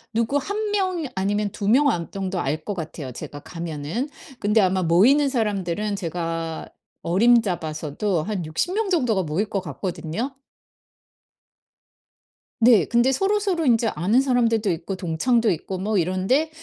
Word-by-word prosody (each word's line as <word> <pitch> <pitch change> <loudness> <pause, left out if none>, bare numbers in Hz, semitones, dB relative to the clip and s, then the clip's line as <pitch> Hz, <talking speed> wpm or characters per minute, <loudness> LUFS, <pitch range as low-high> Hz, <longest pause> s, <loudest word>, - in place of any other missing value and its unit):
누구 230 +5 +1
1 405 +9 -3
명 370 -5 0
아니면 205 +1 0
2 200 - -4
명 280 +5 +5
안 170 -6 -2
정도 190 -2 -3
알 155 +3 -2
것 205 - -2
같아요, 155 -6 -6
제가 145 +4 -8
가면은. 165 - -4 0.3
근데 210 +2 +2
아마 190 -2 +2
모이는 245 - +4
사람들은 210 -4 -1
제가 165 -3 -4 0.4
어림잡아서도 175 -4 +1
한 200 -2 -3
60 160 - -2
명 430 0 0
정도가 250 - +2
모일 175 +7 -2
것 195 - -1
같거든요. 180 - -4 2.3
네. 225 -5 +6
근데 240 +3 +3
서로서로 390 +1 +1
인제 235 -3 +3
아는 200 +11 +3
사람들도 230 -6 +2
있고 170 +3 -4
동창도 215 +7 +1
있고 185 +3 -4
뭐 210 +2 0
이런데 185 - +1
205 Hz, 280 characters per minute, -23 LUFS, 170-245 Hz, 2.3 s, 네